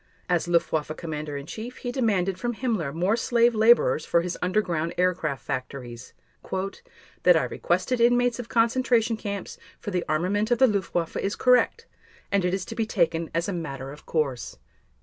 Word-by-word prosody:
As 175 -1 +1
Luftwaffe 160 -3 0
Commander 155 -3 -5
in 140 - -7
Chief 230 - -7
he 245 - -4
demanded 195 -7 0
from 240 -1 -2
Himmler 215 - -1
more 180 +8 +1
slave 235 0 +3
laborers 220 -7 +4
for 170 - +2
his 180 +1 -3
underground 180 -4 0
aircraft 175 -6 0
factories: 125 -3 -6 1.1
"That - - +6
I - - +1
requested 250 -2 -1
inmates 245 0 +3
of 240 - -6
concentration 235 0 +2
camps 200 -3 -6 0.2
for 205 - -5
the 180 -2 0
armament 190 +8 +1
of 240 - +3
the 265 - +6
Luftwaffe 190 -6 -1
is 200 - -1
correct 250 - +3 0.5
and 200 -2 +2
it 180 - +1
is 190 -1 -4
to 225 - -7
be 225 -1 -1
taken 170 -5 0
as 170 +1 0
a 200 - -2
matter 135 -6 -5
of 150 +1 -13
course." 140 -7 -2
185 Hz, 170 wpm, -26 LUFS, 165-230 Hz, 1.1 s, That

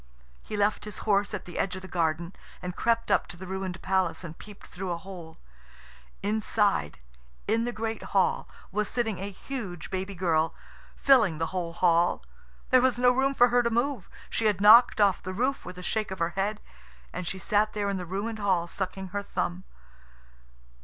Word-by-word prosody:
He 210 - -6
left 205 +1 +1
his 210 -2 -7
horse 200 -1 +2
at 210 -4 -5
the 175 - -7
edge 185 -1 0
of 185 - -8
the - - -7
garden, 170 0 -1 0.3
and 180 -1 -5
crept 230 0 +1
up - - +3
to 175 - -11
the 185 - -8
ruined 190 -1 -4
palace 190 -2 0
and 165 -2 -7
peeped 205 +2 -13
through 185 +1 -6
a 170 - -1
hole. 170 -3 -10 0.9
Inside, 205 - +1 0.5
in 225 +2 +2
the 245 - -1
great 225 -1 -3
hall, 195 -2 +1 0.2
was 210 +2 -1
sitting 225 -5 -1
a 195 +2 -4
huge 195 - -6
baby 190 +1 -3
girl, 165 -3 +1 0.4
filling 225 - +4
the 165 +2 -3
whole 175 -3 -2
hall. 170 0 +2 0.5
There 255 -1 +7
was 260 -1 +2
no 245 0 +5
room 270 +2 +1
for 245 -1 +6
her 245 +1 +4
to 235 - +1
move. 235 -2 -1 0.2
She 225 - -1
had 205 -3 +1
knocked 220 +4 +8
off 200 -3 +4
the 185 - -5
roof 260 +6 0
with 180 0 -8
a 180 - -8
shake 215 +3 -1
of 190 - -5
her 170 -1 0
head. 200 +4 -2 0.5
And 180 - -4
she 190 - -3
sat 210 +2 +1
there 205 -1 -1
in 200 -1 -1
the 180 - -5
ruined 210 +5 -3
hall, 190 -4 +1
sucking 190 +1 -4
her 200 +2 -2
thumb. 185 -2 -3
195 Hz, 195 wpm, -28 LUFS, 180-220 Hz, 0.9 s, knocked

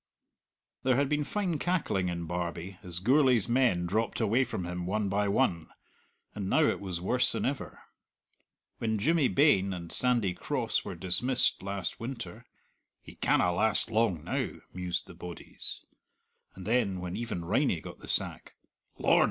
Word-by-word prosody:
There 130 -1 +3
had 140 +1 +2
been 150 0 +1
fine 180 -2 -1
cackling 145 - 0
in 85 -1 -3
Barbie 85 +2 -4
as 90 -2 -5
Gourlay's 125 0 +4
men 120 -8 +2
dropped 110 +6 -1
away 115 +3 +3
from 115 -8 -4
him 90 0 -4
one 105 +1 0
by 100 +1 +1
one; 100 -7 +1 0.7
and 100 -2 -4
now 160 - +4
it - - +2
was 95 -4 -3
worse 125 +8 +2
than - - -1
ever. 135 +1 -4 1.0
When 110 -1 0
Jimmy 150 +6 +3
Bain 100 -11 +4
and 85 -2 -7
Sandy 120 -7 +2
Cross - - -1
were - - -6
dismissed 120 +8 +2
last 100 -2 -3
winter, 115 -1 -6 0.6
"He - - -12
canna 90 - +2
last 110 +4 +3
long 110 -8 +1
now," - - -1 0.2
mused 90 -1 -2
the - - -12
bodies; 90 -2 -7 0.7
and 95 - -9
then 105 -5 +1
when 90 0 -4
even 110 -8 -4
Riney 105 - +2
got - - -10
the - - -11
sack, - - -1 0.4
"Lord!" - - +4
105 Hz, 160 wpm, -30 LUFS, 90-125 Hz, 1.0 s, Gourlay's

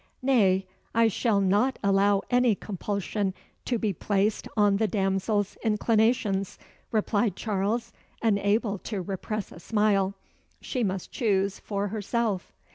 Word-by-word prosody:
"Nay, 195 -8 +3 0.3
I 230 0 +5
shall 220 -1 +1
not 205 +7 +2
allow 200 0 +3
any 245 -3 +4
compulsion 200 0 -3 0.3
to 245 - 0
be 210 -3 -1
placed 200 +4 0
on 205 -1 +4
the 220 +1 +2
damsel's 195 0 0
inclinations," 215 -2 +1 0.3
replied 210 -2 +1
Charles, 220 +3 -1 0.3
unable 205 -1 +1
to 210 0 -4
repress 195 +2 -4
a - - -11
smile. 200 -1 +1 0.4
"She 250 -3 -2
must 190 -3 -2
choose 200 -4 0
for 200 -1 -3
herself." 215 -1 -2
205 Hz, 120 wpm, -27 LUFS, 195-225 Hz, 0.4 s, I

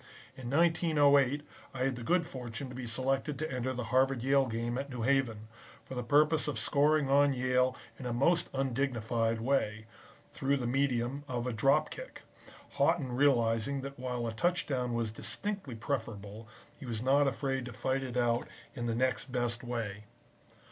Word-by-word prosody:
In 125 -2 -7
1908 145 -3 +3 0.3
I 130 - -1
had 135 -1 0
the 120 - -7
good 170 +7 +2
fortune 125 -3 -6
to - - -9
be 125 -1 -6
selected 135 +4 -1
to 155 +1 -3
enter 130 0 -2
the 125 -1 -3
Harvard 130 -1 +3
Yale 135 0 +3
Game 120 +2 -2
at 140 +1 -5
New 125 -3 -4
Haven, 120 -5 +1 0.4
for - - -8
the 125 - -2
purpose 150 +6 +3
of 145 -6 -2
scoring 145 +4 +3
on 140 0 +4
Yale 125 0 +2 0.2
in 130 - -5
a - - -2
most 165 +8 +2
undignified 120 -4 0
way, 110 -4 0 0.5
through 140 +1 0
the 125 - -3
medium 130 +1 0
of 125 -2 -3
a 125 - -2
drop 135 +7 +3
kick, - - -9 0.5
Haughton 130 -3 +1
realizing 125 0 +2
that 140 -1 -8
while 125 -2 -3
a 115 - -3
touchdown 130 -4 0
was 115 -2 -1
distinctly 195 - -4
preferable, 110 -3 -4 0.3
he 135 - -10
was 115 -1 -3
not 140 +2 +4
afraid 135 0 -1
to 125 - -7
fight 130 +4 -1
it 125 -2 -4
out 120 0 +1 0.3
in 120 -1 -4
the 115 - 0
next 130 0 0
best 120 -1 -1
way. 110 -4 -4
130 Hz, 175 wpm, -31 LUFS, 120-140 Hz, 0.5 s, on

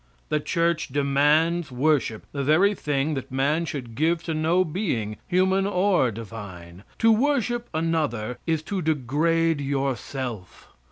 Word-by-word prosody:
The 150 - +1
church 170 +1 0
demands 145 +4 +2
worship, 130 -4 0
the 140 -1 -3
very 170 +9 +4
thing 145 -4 -1
that 135 -3 -5
man 145 +5 +1
should 130 -7 -6
give 160 +6 +1
to 165 - -3
no 165 +4 +2
being, 140 - -2
human 190 +2 +2
or 185 -8 +2
divine. 100 -5 -9
To 225 - +4
worship 240 -1 +1
another 150 -8 -1
is 160 -2 0
to 190 +3 -3
degrade 160 +2 +1
yourself. 135 -6 -4
155 Hz, 130 wpm, -25 LUFS, 130-170 Hz, -, very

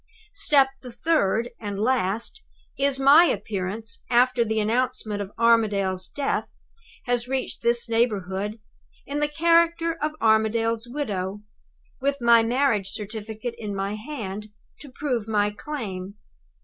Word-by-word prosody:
Step 295 -9 +4
the 250 - -9
third, 235 -3 +1
and 205 -2 -5
last, 230 - 0 0.3
is 275 -1 +1
my 285 +5 +7
appearance, 210 - -3
after 250 0 +4
the 220 -1 -1
announcement 215 -2 0
of 200 0 -6
Armadale's 205 -5 +2
death 280 -1 -1 0.6
has 245 -1 0
reached 260 0 -3
this 235 0 +2
neighborhood, 210 -2 -1 0.5
in 285 +1 -3
the 295 - +2
character 335 +1 +2
of 305 +1 -1
Armadale's 225 +1 +2
widow, 205 -7 -3 0.6
with 280 +1 0
my 235 -1 +6
marriage 230 -4 +1
certificate 215 +3 -5
in 205 -2 -4
my 195 +1 -2
hand 215 -4 -6 0.3
to 290 - -11
prove 250 -6 -2
my 210 -1 +1
claim. 205 -7 -6
230 Hz, 125 wpm, -25 LUFS, 210-270 Hz, 0.6 s, my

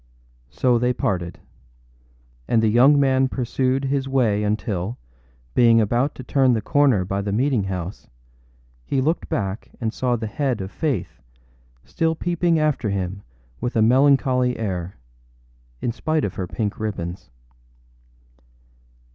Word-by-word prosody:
â - - -33
So 120 +7 +3
they 125 +1 +1
parted; 90 -7 -2 1.1
and 115 -1 +2
the 110 - +4
young 130 +6 +5
man 135 -1 +3
pursued 130 +1 -1
his 135 0 -1
way 115 -6 +2
until, 105 0 -2 0.6
being 115 -2 +5
about 120 +6 +1
to 130 - -8
turn 130 -1 +3
the 115 - +1
corner 135 -10 +3
by 100 +2 -2
the 100 0 -3
meeting 120 -1 +1
house, 90 -1 -5 0.8
he 135 - -1
looked 155 +6 -1
back 100 0 -3
and 115 -2 -2
saw 125 0 0
the 115 -1 -4
head 125 +2 -1
of 95 0 -5
Faith 140 - -3 0.6
still 165 0 -1
peeping 170 0 +1
after 150 -8 0
him 95 0 -3 0.4
with 120 - -3
a 110 - +4
melancholy 130 0 +3
air, 95 -4 -4 0.8
in 120 - -1
spite 155 +5 -1
of 100 - -4
her 95 - -4
pink 105 +2 -3
ribbons. 90 -7 -5
120 Hz, 140 wpm, -22 LUFS, 100-135 Hz, 1.1 s, young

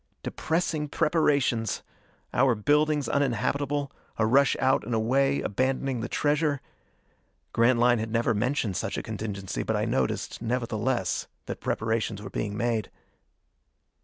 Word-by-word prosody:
Depressing 160 -2 -1
preparations! 140 - +1 0.5
Our 125 -1 +4
buildings 150 +5 +2
uninhabitable, 140 +2 0 0.3
a 110 - +2
rush 135 +4 +4
out 130 -2 +3
and 115 +2 -2
away, 135 +5 +2
abandoning 130 +3 0
the 120 - -4
treasure.... 145 -1 +1 0.9
Grantline 120 0 +4
had 110 0 -3
never 115 0 +2
mentioned 110 -2 0
such - - -2
a - - -3
contingency, 100 -3 -4
but - - -1
I - - 0
noticed, 65 - -1
nevertheless, 115 -3 -1 0.2
that - - -6
preparations 110 -1 -1
were 105 - -8
being 105 -1 -3
made. 115 -3 0
125 Hz, 125 wpm, -27 LUFS, 110-140 Hz, 0.9 s, Our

